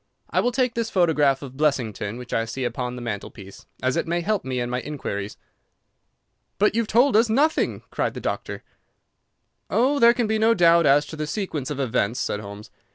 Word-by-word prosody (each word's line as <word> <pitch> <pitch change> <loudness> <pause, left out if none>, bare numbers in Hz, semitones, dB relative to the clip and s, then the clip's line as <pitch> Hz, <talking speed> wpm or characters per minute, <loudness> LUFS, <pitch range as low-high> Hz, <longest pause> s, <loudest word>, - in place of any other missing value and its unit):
I - - +2
will 245 - +1
take 250 -1 0
this 230 -1 -2
photograph 150 -7 +2
of 135 -2 -9
Blessington, 120 -7 -1
which 125 -1 -8
I 115 - +1
see 130 +3 -5
upon 125 +1 -3
the 125 - -7
mantelpiece, 100 -3 -7 0.2
as 130 0 +1
it - - -1
may 170 +1 0
help 210 +3 -1
me 130 -1 -3
in 120 - -1
my 125 +1 -2
inquiries." 105 -9 -5 1.2
"But 210 +1 +3
you 230 - +2
have 225 - -4
told 245 +3 +3
us 225 +1 +4
nothing!" 290 +8 +1
cried - - -2
the - - -4
doctor. - - -4 1.1
"Oh, 270 +5 +2
there 235 -1 +6
can 240 - +1
be 220 0 0
no 225 +1 +4
doubt 170 -2 +5
as 145 +2 +4
to 160 - -9
the 155 0 -4
sequence 155 -7 -3
of 145 -2 -4
events," 125 -2 0
said 105 - -2
Holmes. 105 +1 -10
150 Hz, 205 wpm, -23 LUFS, -, 1.2 s, there